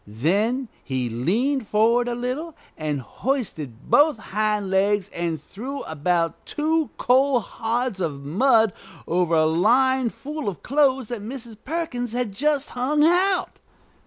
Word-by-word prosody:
Then 200 - 0 0.2
he 130 -4 -2
leaned 225 - 0
forward 230 +4 +3
a 240 - -1
little, 260 +7 -4 0.2
and 150 -3 -2
hoisted 155 - -4
both 295 -2 +5
hind 210 -2 -1
legs, 200 +1 +2
and 170 -2 -2
threw 260 - -7
about 165 +2 -1
two 315 0 0
coal 260 +1 +3
hods 230 -1 -2
of 145 -5 -3
mud 220 - +3 0.3
over 170 -1 +1
a 155 -1 +4
line 245 +10 +3
full 295 0 -5
of 175 -8 -9
clothes 265 -3 +2
Mrs. 235 +1 -6
Perkins 260 -7 -3
had 245 -3 -1
just 290 +5 0
hung 280 +5 +1
out. 370 +3 +2
230 Hz, 130 wpm, -23 LUFS, 180-270 Hz, 0.3 s, both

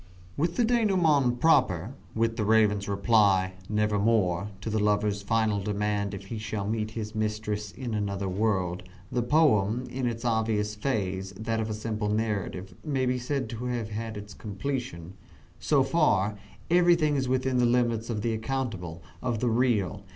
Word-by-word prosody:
With 165 +4 0
the 240 - +3
denouement 175 - +3
proper 125 - +3 0.2
with 115 0 +1
the 110 - -1
Raven's 105 -2 +3
reply, 100 -2 +3 0.2
"Nevermore," 105 -3 +1
to 110 - -4
the 110 - +1
lover's 105 0 +1
final 110 0 +1
demand 105 0 -1
if 95 0 -9
he 110 +3 -5
shall 105 -2 -3
meet 110 0 -1
his 105 -1 -4
mistress 105 -1 -2
in 120 -1 -5
another 100 -2 -2
world 95 -2 0 0.3
the 125 - +1
poem, 120 -4 +3
in 130 -1 -1
its 115 0 -4
obvious 110 -2 +1
phase, 100 -5 -2
that 110 +3 -2
of 110 0 -2
a 110 - -2
simple 105 -1 -2
narrative, 105 -4 -2
may 135 -4 0
be 125 0 0
said 130 0 -2
to 115 +1 -5
have 110 -2 -3
its 105 0 -8
completion. 105 -5 -5 0.5
So 140 -3 +3
far, 120 - +2 0.4
everything 170 -4 +4
is 135 -2 0
within 130 0 +1
the 120 - +4
limits 120 -2 +1
of 110 -3 -2
the 115 - 0
accountable 110 -9 -3 0.2
of 120 -3 -1
the 120 - +1
real. 110 -4 +1
110 Hz, 160 wpm, -28 LUFS, 105-125 Hz, 0.5 s, everything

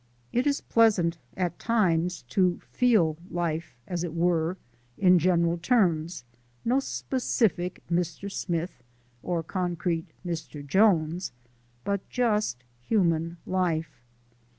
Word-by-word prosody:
It 245 +4 +2
is 285 -1 +1
pleasant 190 -8 +3 0.2
at 175 -2 -1
times 180 - +1
to 180 +2 +2
feel 205 -11 +3
life, 170 -4 -2
as 175 -1 -3
it 170 -2 -4
were, 170 +1 +1 0.4
in 180 -2 +5
general 170 0 +2
terms: 170 - +1 0.4
no 250 +3 +3
specific 225 - -1
Mr. 175 +3 -2
Smith 170 -6 -3 0.4
or 175 -2 -1
concrete 175 -1 -2 0.2
Mr. 160 -4 -5
Jones, 175 - +2 0.5
but 200 -1 -2
just 210 - 0 0.2
human 170 - +1
life. 165 -7 -1
175 Hz, 105 wpm, -27 LUFS, 165-195 Hz, 0.5 s, in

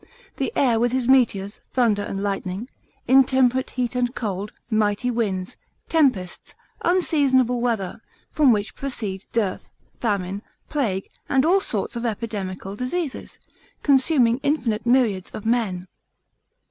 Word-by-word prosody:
The - - -1
air 240 -5 +3
with 240 +1 +1
his 255 -2 0
meteors, 220 -6 +2
thunder 230 -5 +2
and 195 -1 -4
lightning, 195 +2 -3 0.4
intemperate 260 -1 +4
heat 250 -1 -2
and 245 0 0
cold, 205 -2 -3 0.2
mighty 215 +1 +1
winds, 195 -6 -2 0.3
tempests, 255 - +1 0.3
unseasonable 275 -9 +2
weather; 225 -5 -1 0.3
from 290 -4 +4
which 205 -2 0
proceed 210 -8 -4
dearth, 210 -5 -1 0.3
famine, 200 -3 -1 0.3
plague, 215 -11 -1 0.2
and 265 +1 +3
all 365 +4 +5
sorts 215 - -2
of 235 - -3
epidemical 200 -4 -4
diseases, 265 +5 -4 0.5
consuming 265 -4 +4
infinite 245 -7 0
myriads 235 -7 +2
of 215 - -7
men. 215 -6 0
235 Hz, 120 wpm, -23 LUFS, 205-260 Hz, 0.5 s, all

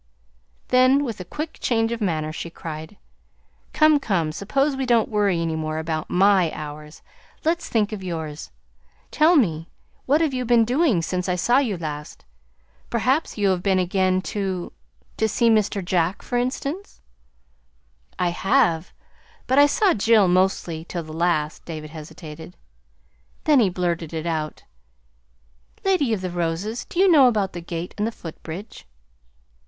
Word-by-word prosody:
Then, 255 +3 +5
with 230 -8 -4
a - - -5
quick 305 - -6
change 225 -1 +1
of 235 -1 -3
manner, 155 -5 -1
she 170 - -6
cried: 160 +3 -8 0.7
"Come, 310 -1 +4
come, 175 - 0
suppose 270 - 0
we 265 -1 -2
don't 235 -2 +3
worry 205 -5 +1
any 165 -1 -1
more 155 0 -3
about 160 -1 -3
MY 190 -3 +4
hours. 150 0 -9 0.4
Let's 335 +1 0
think 215 -2 +1
of 210 -3 -5
yours. 160 -4 -5 0.6
Tell 315 +3 +4
me, 170 - +1 0.4
what 290 +4 +4
have 315 -4 +1
you 255 -1 -1
been 235 -1 +4
doing 250 - +2
since 180 +2 -2
I 180 - +1
saw 240 +8 +3
you 225 -9 -1
last? 150 -2 -7 0.6
Perhaps 255 +6 0
you 205 -2 +2
have 185 -2 +1
been 190 0 +2
again 185 0 +1
to 190 -4 -3 0.4
to 220 - +2
see 230 +2 +2
Mr. 210 -3 +1
Jack, 175 0 0
for 245 - -4
instance." 275 +9 -3 1.2
"I 180 - +1
have; 175 -3 +1 0.5
but 260 +2 +3
I 290 - +8
saw 375 +5 +3
Jill 215 -1 +4
mostly, 180 -3 +1
till 170 0 -5
the 155 0 -10
last." 160 -2 0
David 155 -2 -7
hesitated, 160 +1 -10 0.9
then 300 -3 +5
he 210 -5 +4
blurted 170 -3 -2
it 160 0 -4
out: 155 -2 -3 1.2
"Lady 365 -11 +2
of 215 -4 -1
the 185 -1 -3
Roses, 175 +6 -2
do - - -10
you 390 - +6
know 300 -8 +7
about 210 -5 0
the 175 - -6
gate 170 +1 -5
and 210 - +1
the - - -2
footbridge?" 170 - -9
190 Hz, 160 wpm, -23 LUFS, 165-240 Hz, 1.2 s, I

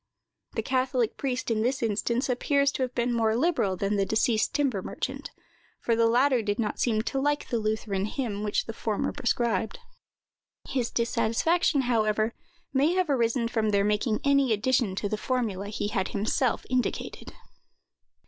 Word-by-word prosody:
The 225 - -2
catholic 255 -2 0
priest, 255 -3 -2
in 215 -1 +1
this 250 +2 0
instance, 230 +3 0
appears 280 +2 +2
to - - -4
have 255 -1 -2
been 240 0 0
more 225 -1 +2
liberal 245 - +1
than 200 +2 0
the 200 - +2
deceased 220 0 +2
timber 265 -9 0
merchant, - - -5 0.5
for 230 - +1
the 230 0 +4
latter 250 +2 +3
did 205 -1 -1
not 215 -3 -2
seem 220 -3 +1
to 270 - -2
like 290 +1 0
the 235 - 0
Lutheran 215 -2 -1
hymn 215 -3 -3
which 210 -1 0
the 225 - -6
former 220 +4 -2
prescribed. 235 - 0 0.9
His 250 -4 -1
dissatisfaction, 240 - +1
however, 220 -2 +1 0.4
may 285 +5 +3
have 365 -5 +1
arisen 235 -2 +1
from 225 -2 0
their 200 -1 +2
making 210 +2 0
any 275 -3 +3
addition 225 -2 +1
to 205 - -2
the 215 - -2
formula 215 -5 -2
he 205 0 -3
had 190 -3 -1
himself 220 +4 0
indicated. 255 -1 -2
230 Hz, 165 wpm, -27 LUFS, 215-260 Hz, 0.9 s, the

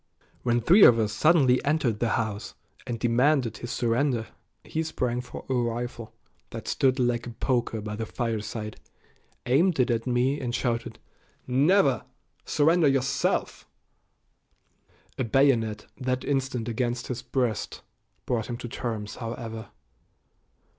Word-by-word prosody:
When 120 -1 +1
three 185 - +6
of 115 - +8
us 105 -2 0
suddenly 135 -3 +4
entered 140 -7 +1
the 120 - +1
house 110 -2 -4 0.3
and 120 -2 -3
demanded 125 0 +2
his 120 - -7
surrender 120 0 0 0.3
he 160 - -3
sprang 125 -6 -2
for 125 - -10
a 135 - -1
rifle 120 -1 -2 0.4
that - - -8
stood 130 -1 +2
like 120 -2 0
a 120 - -9
poker 120 -4 0
by 105 0 -5
the 110 +1 -4
fireside, 110 -2 -4 0.7
aimed 160 +6 +3
it 125 -1 +3
at 115 +1 -1
me, 125 +3 +1
and 120 -1 -2
shouted 120 -2 -2 0.5
"Never! 140 - +3 0.4
Surrender 160 +2 +3
yourself." 135 0 0 1.5
A - - +2
bayonet 115 -4 +2
that 130 -1 -1
instant 130 -4 -1
against 120 +1 -2
his 125 -1 -4
breast 125 -3 -2 0.4
brought 115 -3 -1
him 120 - -3
to 120 - -6
terms, 110 -3 -5
however. 115 -1 -6
120 Hz, 135 wpm, -26 LUFS, 115-135 Hz, 1.5 s, of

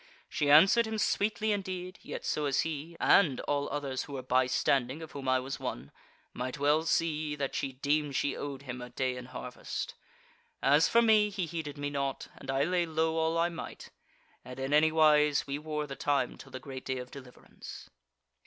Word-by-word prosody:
She 145 - -1
answered 195 +10 +7
him 220 0 -3
sweetly 215 +1 +1
indeed, 185 -2 -4
yet - - -7
so 150 - 0
as 135 - +2
he 160 +1 -5
(and 150 -10 +4
all 145 0 -1
others 140 -2 -3
who 145 - -10
were 130 -2 -4
bystanding, 130 +2 +1
of 160 - -10
whom 135 -2 -4
I 130 0 +4
was 135 +2 -5
one,) 65 +3 -5 0.4
might 130 +3 -4
well 145 +2 +3
see 155 -2 0
that 140 -2 -3
she 135 -1 -2
deemed 145 +1 0
she 145 - 0
owed 140 -1 -6
him 125 -2 -6
a 125 - -7
day 130 +1 -1
in 125 0 -7
harvest. 125 -1 -6 0.7
As 145 +3 +4
for 235 0 +5
me, 215 -2 +5
he 195 -3 -2
heeded 160 -3 -5
me 145 0 -3
naught, 140 -1 -3
and - - -12
I 135 +1 +2
lay 175 0 +1
low 160 0 0
all 160 +1 +1
I 170 +1 +2
might. 165 -2 -8 0.5
And 125 +1 -9
in 135 +2 -2
any 155 +1 +5
wise 150 -2 +4
we 140 0 -3
wore 150 0 -3
the 140 -2 -7
time 140 -4 0
till - - -13
the 130 - -6
great 130 0 -8
day 130 -1 -2
of 125 0 -7
deliverance." 130 -3 -11
145 Hz, 200 wpm, -30 LUFS, 135-160 Hz, 0.7 s, answered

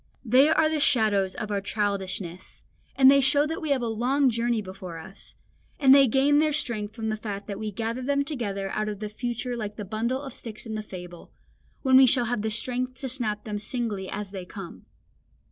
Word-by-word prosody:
They 255 +6 +5
are 315 0 +4
the 310 -1 0
shadows 210 -8 +2
of 215 -3 -5
our 200 -1 0
childishness, 195 -3 -3 0.3
and 265 0 +7
they 280 0 +5
show 285 +2 +4
that 320 +1 -4
we 315 - -3
have 270 -3 +1
a - - -1
long 250 +4 +2
journey 235 0 0
before 185 -4 -7
us; 190 +4 -11 0.4
and 270 -2 +7
they 275 -1 +7
gain 275 +5 +3
their 305 -1 +2
strength 230 -8 -2
from 220 -2 -3
the 215 - 0
fact 205 -2 -6
that 200 -1 -6
we 215 -1 -3
gather 230 +4 -3
them 280 +2 +1
together 205 -10 -3
out 215 0 -1
of 205 -2 -5
the 210 -1 -4
future 240 +2 -3
like 210 -3 -5
the 210 - -6
bundle 230 +6 -1
of 270 -3 -7
sticks 220 -1 -7
in 220 - -5
the 215 - -3
fable, 180 -4 -10 0.5
when 260 -2 +6
we 265 0 +8
shall 245 0 +3
have 235 -2 -1
the 220 - -1
strength 250 +3 -2
to 270 - -3
snap 225 -5 -2
them 210 -2 -4
singly 215 -3 -3
as 205 -1 -5
they 190 -2 -6
come. 180 -1 -10
225 Hz, 215 wpm, -26 LUFS, 205-260 Hz, 0.5 s, we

